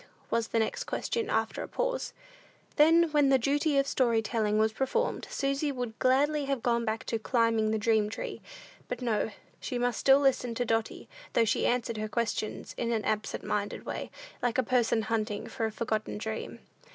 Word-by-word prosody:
was 230 -1 +1
the - - -1
next 220 - 0
question, 460 -2 -2
after 220 0 0
a - - -5
pause. - - -2 0.6
Then, 325 +2 +5
when 295 -2 +4
the 270 - +6
duty 285 +4 +1
of 275 - +4
story 235 -5 +2
telling 215 -1 0
was 220 0 +2
performed, 270 - -1
Susy 275 +1 0
would 245 -4 -5
gladly 285 +3 +3
have 275 -3 -2
gone 235 -1 +1
back 220 0 -2
to 225 - -2
"climbing 225 -2 +2
the 220 - +1
dream 215 -1 +2
tree;" 220 - -6 0.5
but 250 - -4
no, 225 -3 +1 0.3
she 250 - -3
must 245 -1 0
still 270 0 +6
listen 255 -4 +1
to 245 - 0
Dotty, 225 -1 -1 0.3
though 230 - +4
she 225 - +1
answered 240 -2 0
her 215 0 -3
questions 225 -1 -2
in 235 -1 0
an 220 -2 -1
absent 215 0 -2
minded 205 0 -2
way, - - -4 0.3
like 245 -2 0
a 260 - +3
person 235 -2 +2
"hunting 215 -2 -2
for 225 - -2
a - - -5
forgotten 215 - -2
dream." 110 +1 -5
235 Hz, 190 wpm, -29 LUFS, 220-270 Hz, 0.6 s, the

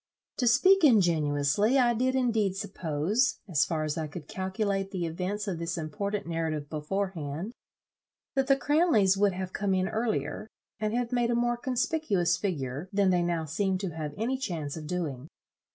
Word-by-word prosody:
To 250 - +1
speak 375 +11 +5
ingenuously, 175 - +3
I 240 -2 +4
did 255 +3 +1
indeed 225 -7 +1
suppose, 195 - 0
as 145 -6 +2
far 155 +1 -2
as 155 +1 -2
I 155 - -2
could 150 0 -9
calculate 195 +1 -2
the 180 -3 -3
events 185 +6 -3
of 180 -4 -2
this 170 +1 -3
important 200 +6 -3
narrative 160 -3 -3
beforehand, 165 +2 -3 0.8
that 270 -2 +1
the 275 - +5
Miss 270 - -11
Cranleys 290 - +4
would 200 -1 +2
have 185 0 -5
come 195 -1 0
in 185 0 +1
earlier, 215 - -2 0.3
and 215 +1 -1
have 245 0 -1
made 240 -1 +1
a 240 - +2
more 240 0 +1
conspicuous 240 - 0
figure, 150 -4 -3
than 195 -1 +3
they 180 -1 +3
now 170 -2 -1
seem 190 +5 0
to 185 -2 -4
have 155 -2 -5
any 250 +5 -1
chance 160 - -3
of 155 -2 -7
doing. 150 -6 -3
190 Hz, 175 wpm, -28 LUFS, 160-230 Hz, 0.8 s, speak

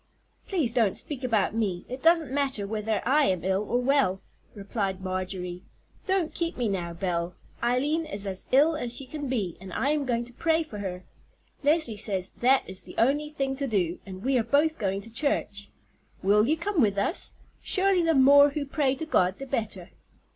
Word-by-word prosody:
"Please 315 - 0
don't 225 -6 +2
speak 275 -3 -5
about 220 -5 +1
me; 200 -6 -1
it 255 +2 -7
doesn't 325 -5 +3
matter 270 -7 0
whether 215 +1 -2
I 290 +3 +4
am 185 - 0
ill 190 +1 +1
or 235 +4 0
well," 250 -7 +2 0.4
replied 195 -2 -3
Marjorie. 185 -1 -4 0.5
"Don't 380 -4 0
keep 335 0 -2
me 245 -2 0
now, 180 -4 -2
Belle. 170 -1 -2 0.3
Eileen 285 +7 +1
is 205 -9 -4
as 190 -1 -4
ill 300 +5 +5
as 245 -5 -2
she 270 - -5
can 290 +1 -6
be, 205 -10 -2
and 190 -1 -9
I 275 +10 0
am 295 -3 -1
going 240 -1 0
to 245 - -5
pray 325 +4 +1
for 220 -9 -9
her. 185 -2 -5 0.6
Leslie 290 -5 +2
says 195 -3 -2
that 260 +2 +3
is 185 0 -4
the - - -11
only 290 +5 +2
thing 275 -3 -2
to 280 0 -2
do, 185 -7 0
and 190 0 -9
we 260 0 +2
are - - +1
both 310 +6 +2
going 195 -2 -1
to 225 - -12
church. 220 -6 -2 0.5
Will 210 +3 +4
you 310 +3 +2
come 345 0 0
with 200 -4 +2
us? 200 - -2 0.3
Surely 385 -1 +2
the 330 -1 +2
more 285 +2 +7
who 285 0 -3
pray 275 -1 0
to 320 - -5
God 185 -11 +2
the 275 - -6
better." 215 -8 -4
240 Hz, 200 wpm, -27 LUFS, 195-285 Hz, 0.6 s, more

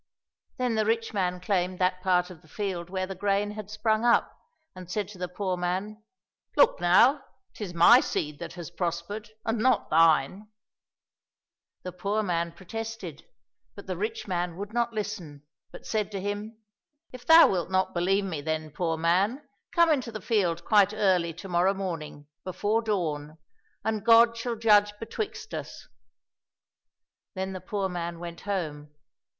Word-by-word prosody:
Then 250 -2 0
the 215 -1 +1
rich 225 0 0
man 180 -3 -1
claimed 185 -1 -1
that 185 0 0
part 180 -1 +1
of 170 - -13
the - - -21
field 180 -1 -4
where 185 0 -2
the 195 - -6
grain 200 +2 0
had 210 -1 -8
sprung 215 +1 0
up, 240 -1 +3 0.4
and 185 -1 -10
said 205 +1 -2
to 200 -3 -12
the 180 - -2
poor 185 +1 -2
man, 190 +5 -3 0.3
'* - - -41
Look - - +5
now! 245 +11 +5 0.3
'tis 190 -5 -7
my 230 +9 +8
seed 150 - -3
that - - -7
has 175 -4 -8
prospered, 175 +5 -4 0.2
and 225 0 0
not 255 +4 +2
thine! 165 +5 +3 0.7
" - - -63
The 180 - -5
poor 200 +4 -1
man 170 -3 -1
protested, 195 -3 -7 0.5
but 200 - -10
the 185 - -3
rich 215 +5 -4
man 175 -2 -2
would 200 +2 -6
not 235 0 0
listen, 195 -10 -5 0.3
but - - -12
said 215 -2 -1
to 195 - -3
him, 205 +3 -4 0.3
" 295 +2 -50
If 250 -1 -10
thou 325 +1 +9
wilt 180 -2 -1
not 185 0 +1
believe 195 +3 +1
me, 165 -6 -4
then, 155 0 -3
poor 165 +1 -1
man, 195 - +1 0.2
come 340 -1 +4
into 260 -6 0
the 215 - -6
field 175 -8 0
quite 205 -1 +4
early 185 -5 +2
to 185 +3 -9
morrow 180 +2 +2
morning, 165 -6 -5 0.2
before 205 +4 0
dawn, 160 -8 -2 0.5
and 220 -2 -1
God 230 0 +6
shall 230 +1 -3
judge 210 -2 +4
betwixt 220 -4 -6
us." 155 -3 -7 1.5
Then 190 0 -3
the 185 - -6
poor 200 -2 -2
man 175 -2 -4
went 170 0 -8
home. 150 -7 -4
190 Hz, 170 wpm, -27 LUFS, 175-215 Hz, 1.5 s, thou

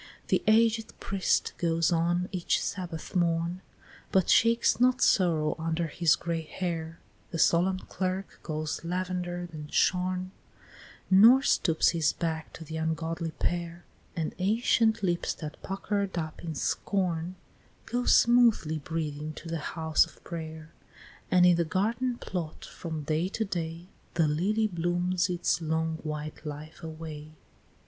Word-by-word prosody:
The - - +3
aged 225 0 +3
priest 195 -1 0
goes 165 0 +2
on 175 +2 +1
each 180 -3 0
Sabbath 180 -2 -5
morn, 170 +1 +1 0.5
But 190 -2 +3
shakes 230 +1 +4
not 255 +1 +4
sorrow 165 -9 +3
under 165 +1 -1
his 165 0 +3
gray 170 -1 -3
hair; 165 -1 -4 0.3
The 170 - -4
solemn 180 +3 +3
clerk 185 +1 -4
goes 155 0 -3
lavender'd 175 0 -3
and 150 -1 -8
shorn 185 0 +1 0.8
Nor 230 +8 +8
stoops 165 -10 +3
his 165 -4 +1
back 160 -2 -3
to 165 - -9
the 160 +1 -6
ungodly 160 +1 -2
pair; 170 +1 -3 0.3
And 160 -2 -2
ancient 220 +2 +2
lips 175 -2 0
that 155 -2 -8
pucker'd 195 -1 -2
up 155 -1 -4
in 160 -2 -4
scorn, 180 +1 -1 0.5
Go 245 +1 -2
smoothly 235 -10 +4
breathing 155 -1 -4
to 165 - -9
the 165 -1 -2 0.2
house 160 -1 +4
of - - -19
pray'r; 160 -2 -7 0.6
And 180 -1 +5
in 175 -1 +6
the 170 - +3
garden 230 +9 -1
plot, 170 -8 -5
from 160 -3 -6
day 155 +4 0
to 220 +2 -2
day, 170 -2 -4 0.3
The 165 -2 +3
lily 195 +9 +1
blooms 175 -1 0
its 175 -1 0
long 160 0 -1
white 150 -1 -6
life 150 +2 -8
away. 155 -2 -8
170 Hz, 140 wpm, -28 LUFS, 160-185 Hz, 0.8 s, Nor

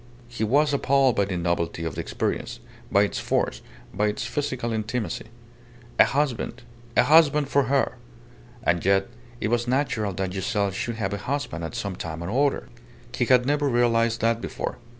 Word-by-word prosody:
He 120 -2 -4
was 145 +6 +3
appalled 135 -2 +3
by 100 - +2
the 95 -2 -3
novelty 85 -1 -1
of 80 - -3
the - - -3
experience, - - -3 0.3
by 100 - +5
its 105 - -2
force, - - -1 0.3
by 105 +2 +1
its 105 0 -2
physical 130 -5 -2
intimacy. 110 +1 -3 0.7
A - - +9
husband! 135 -4 -1 0.3
A - - +7
husband 150 -2 +5
for 140 -1 +3
her! 135 -2 +1 0.7
And 85 -3 +1
yet 95 +2 +2 0.3
it 105 - -1
was 120 +1 0
natural 125 -6 0
that 95 0 -3
Giselle 100 +1 0
should 115 +5 -3
have 110 -2 -2
a - - -1
husband 125 - -3
at 80 - -5
some 100 -2 -3
time 80 -1 -5
or 125 +11 +2
other. 140 - -4 0.5
He 125 - +1
had 125 0 +4
never 145 +1 +1
realized 115 -1 +2
that 115 +1 +2
before. - - -4
115 Hz, 175 wpm, -25 LUFS, 100-135 Hz, 0.7 s, A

